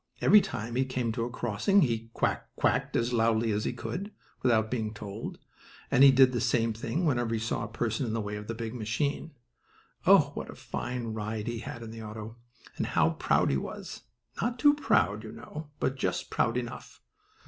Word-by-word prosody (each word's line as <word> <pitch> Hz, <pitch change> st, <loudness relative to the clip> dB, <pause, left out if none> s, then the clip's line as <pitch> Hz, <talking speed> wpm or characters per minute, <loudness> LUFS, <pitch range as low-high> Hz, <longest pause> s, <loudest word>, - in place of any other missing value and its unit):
Every 210 Hz, -, +7 dB
time 115 Hz, -, -5 dB
he 130 Hz, -, +3 dB
came 130 Hz, -3 st, -2 dB
to 115 Hz, 0 st, -2 dB
a -, -, -4 dB
crossing 120 Hz, -, +2 dB
he 115 Hz, -3 st, -1 dB
"quack -, -, 0 dB
quacked" -, -, +1 dB
as 120 Hz, +1 st, +1 dB
loudly 115 Hz, -1 st, +2 dB
as 105 Hz, +1 st, -1 dB
he -, -, 0 dB
could, 190 Hz, -, -5 dB, 0.3 s
without 110 Hz, -3 st, +2 dB
being 110 Hz, -3 st, -2 dB
told, 105 Hz, +1 st, -6 dB, 0.5 s
and 130 Hz, -, +6 dB
he 140 Hz, -, +10 dB
did 130 Hz, -1 st, +6 dB
the 120 Hz, -, -1 dB
same 115 Hz, -2 st, +2 dB
thing 115 Hz, +10 st, -2 dB
whenever 120 Hz, -6 st, +1 dB
he -, -, -1 dB
saw 110 Hz, 0 st, -2 dB
a -, -, -6 dB
person 115 Hz, +2 st, -2 dB
in 110 Hz, -, -2 dB
the 115 Hz, -, 0 dB
way 105 Hz, -1 st, -3 dB
of 105 Hz, 0 st, -7 dB
the 115 Hz, -, -3 dB
big 115 Hz, 0 st, -5 dB
machine. 140 Hz, +7 st, -2 dB, 0.7 s
Oh, -, -, +7 dB
what -, -, -6 dB
a -, -, -8 dB
fine 120 Hz, -3 st, -4 dB
ride 110 Hz, 0 st, -3 dB
he 120 Hz, -1 st, -3 dB
had 115 Hz, 0 st, -7 dB
in 110 Hz, -, -8 dB
the 115 Hz, 0 st, -8 dB
auto, 110 Hz, +1 st, -8 dB, 0.4 s
and -, -, -1 dB
how -, -, +3 dB
proud -, -, +2 dB
he 70 Hz, -, +2 dB
was! -, -, -6 dB, 0.4 s
Not 240 Hz, +3 st, -1 dB
too 290 Hz, +3 st, +6 dB
proud, 210 Hz, -, +2 dB
you 110 Hz, -, -8 dB
know, 155 Hz, 0 st, -8 dB
but 135 Hz, -, 0 dB
just -, -, -2 dB
proud 115 Hz, +1 st, +1 dB
enough. 120 Hz, -1 st, -6 dB
115 Hz, 205 wpm, -29 LUFS, 110-130 Hz, 0.7 s, he